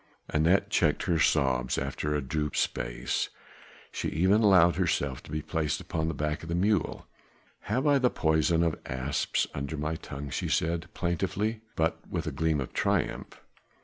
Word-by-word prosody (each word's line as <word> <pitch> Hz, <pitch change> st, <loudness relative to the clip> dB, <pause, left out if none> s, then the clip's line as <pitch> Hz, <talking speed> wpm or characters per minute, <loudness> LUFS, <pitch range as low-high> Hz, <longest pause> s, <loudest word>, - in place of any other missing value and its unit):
Anat 80 Hz, +5 st, +3 dB
checked -, -, +2 dB
her 85 Hz, -2 st, +1 dB
sobs 65 Hz, -5 st, +2 dB
after 75 Hz, 0 st, -2 dB
a 75 Hz, -, -1 dB
due 75 Hz, +3 st, -1 dB
space; -, -, -1 dB, 0.6 s
she -, -, -2 dB
even 95 Hz, +7 st, +3 dB
allowed 90 Hz, -6 st, +5 dB
herself 70 Hz, -7 st, 0 dB
to -, -, -13 dB
be 75 Hz, 0 st, -2 dB
placed 75 Hz, -2 st, -1 dB
upon 80 Hz, 0 st, -2 dB
the 80 Hz, -, -2 dB
back 75 Hz, +1 st, -2 dB
of 80 Hz, -, -9 dB
the 85 Hz, -, 0 dB
mule. 100 Hz, -1 st, +1 dB, 0.6 s
"Have 125 Hz, +7 st, 0 dB
I 145 Hz, -2 st, +5 dB
the 125 Hz, -1 st, +3 dB
poison 80 Hz, 0 st, +2 dB
of 80 Hz, -2 st, 0 dB
asps 65 Hz, +2 st, 0 dB
under 70 Hz, +2 st, -4 dB
my 75 Hz, +2 st, -2 dB
tongue?" 70 Hz, -2 st, -7 dB
she -, -, -2 dB
said 85 Hz, 0 st, 0 dB
plaintively, 100 Hz, +5 st, -1 dB
but 80 Hz, 0 st, +1 dB
with -, -, -2 dB
a -, -, -2 dB
gleam 80 Hz, -1 st, 0 dB
of 65 Hz, -, -5 dB
triumph. -, -, -1 dB
80 Hz, 170 wpm, -29 LUFS, 75-90 Hz, 0.6 s, allowed